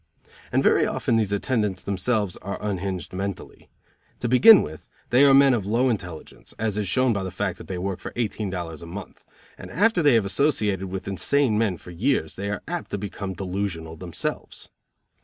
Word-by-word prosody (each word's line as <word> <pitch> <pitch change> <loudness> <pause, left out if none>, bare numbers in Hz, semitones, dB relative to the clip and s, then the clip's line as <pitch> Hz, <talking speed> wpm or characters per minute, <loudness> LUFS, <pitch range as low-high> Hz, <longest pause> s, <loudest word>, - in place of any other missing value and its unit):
And - - +2
very - - +4
often 115 - 0
these 105 -3 0
attendants 105 -2 -1
themselves 100 0 -1
are 100 +1 -5
unhinged 95 -4 -4
mentally. 100 +1 -6 0.5
To 120 - 0
begin 195 - +8
with, 80 +1 -9 0.2
they 125 +3 +6
are 140 - +6
men 135 -1 +6
of 105 -5 -1
low 120 +5 +2
intelligence, 90 -7 -7
as 110 -2 -1
is 105 -2 -1
shown 130 +4 +2
by 100 - -2
the 95 - -3
fact 90 - -3
that - - -10
they 95 - -4
will 90 - -4
work 95 -2 -3
for - - -7
eighteen 110 -3 -2
dollars 85 -4 -5
a 85 - -9
month, 95 +3 -9 0.3
and - - -9
after 205 +1 +2
they 145 -5 +5
have 110 -3 +3
associated 100 - +1
with 95 0 -6
insane 115 +5 +1
men 105 -5 +1
for 90 - -12
years 90 - 0
they 100 +1 -4
are 100 - -4
apt 175 +1 -4
to - - -3
become 100 -1 -5
delusional 90 -3 -4
themselves. 85 0 -5
100 Hz, 195 wpm, -24 LUFS, 95-120 Hz, 0.5 s, begin